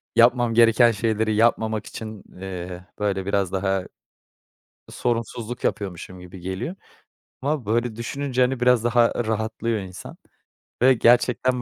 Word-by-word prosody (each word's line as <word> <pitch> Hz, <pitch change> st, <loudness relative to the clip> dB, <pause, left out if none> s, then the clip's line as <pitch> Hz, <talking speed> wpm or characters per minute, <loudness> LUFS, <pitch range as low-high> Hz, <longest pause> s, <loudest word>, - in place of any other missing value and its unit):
yapmam 120 Hz, 0 st, +4 dB
gereken 115 Hz, +1 st, +5 dB
şeyleri 110 Hz, 0 st, 0 dB
yapmamak 110 Hz, -1 st, +1 dB
için, 110 Hz, -2 st, -8 dB, 0.2 s
eee, 90 Hz, -1 st, -6 dB
böyle 100 Hz, -2 st, -1 dB
biraz 100 Hz, -2 st, 0 dB
daha 95 Hz, 0 st, 0 dB, 1.1 s
sorumsuzluk 120 Hz, 0 st, -3 dB
yapıyormuşum 95 Hz, -2 st, -3 dB
gibi 90 Hz, +1 st, -11 dB
geliyor 95 Hz, -, -4 dB, 0.7 s
ama 140 Hz, -2 st, -1 dB
böyle 115 Hz, +2 st, 0 dB
düşününce, 130 Hz, +2 st, -2 dB
hani, 125 Hz, 0 st, +2 dB
biraz 125 Hz, -2 st, +4 dB
daha 120 Hz, 0 st, +3 dB
rahatlıyor 110 Hz, +1 st, -1 dB
insan 95 Hz, -1 st, -9 dB, 0.6 s
ve 130 Hz, +2 st, +7 dB
gerçekten 125 Hz, +1 st, +3 dB
110 Hz, 120 wpm, -23 LUFS, 100-120 Hz, 1.1 s, ve